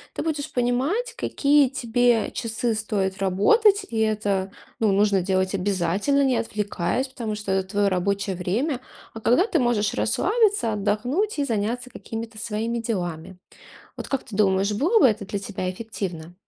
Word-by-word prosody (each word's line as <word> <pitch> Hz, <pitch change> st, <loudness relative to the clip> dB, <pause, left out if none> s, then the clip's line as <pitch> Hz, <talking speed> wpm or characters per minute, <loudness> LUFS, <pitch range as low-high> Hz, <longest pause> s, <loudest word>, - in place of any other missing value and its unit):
ты -, -, -2 dB
будешь 300 Hz, -3 st, -3 dB
понимать, 270 Hz, -, 0 dB
какие 290 Hz, -, +3 dB
тебе 245 Hz, -3 st, +1 dB
часы 230 Hz, 0 st, -2 dB
стоит 200 Hz, -3 st, -2 dB
работать, 390 Hz, -, +3 dB
и 225 Hz, -, -3 dB
это, 205 Hz, -3 st, 0 dB, 0.3 s
ну, 220 Hz, -3 st, +3 dB
нужно 200 Hz, -1 st, +3 dB
делать 185 Hz, +1 st, 0 dB
обязательно, 195 Hz, +8 st, +1 dB
не 260 Hz, -3 st, +2 dB
отвлекаясь, 210 Hz, +3 st, -2 dB
потому 235 Hz, -5 st, -4 dB
что 210 Hz, -2 st, -4 dB
это 190 Hz, 0 st, 0 dB
твоё 205 Hz, 0 st, +2 dB
рабочее 195 Hz, +1 st, -1 dB
время. 240 Hz, -, -1 dB, 0.3 s
А 225 Hz, -, -8 dB
когда 250 Hz, -, +4 dB
ты -, -, 0 dB
можешь 235 Hz, -5 st, +1 dB
расслабиться, 375 Hz, -, +1 dB
отдохнуть 245 Hz, -, -1 dB
и 285 Hz, -, +1 dB
заняться 235 Hz, +2 st, -2 dB
какими-то 225 Hz, -1 st, -7 dB
своими 225 Hz, +2 st, -2 dB
делами? 180 Hz, -6 st, -4 dB, 0.6 s
Вот -, -, -7 dB
как 275 Hz, -, -2 dB
ты 215 Hz, -, -10 dB
думаешь, 195 Hz, 0 st, +2 dB
было 330 Hz, -, +3 dB
бы -, -, +7 dB
это 210 Hz, -3 st, 0 dB
для 200 Hz, -, -3 dB
тебя 190 Hz, -2 st, -4 dB
эффективно? 180 Hz, -5 st, -6 dB
215 Hz, 155 wpm, -24 LUFS, 195-250 Hz, 0.6 s, бы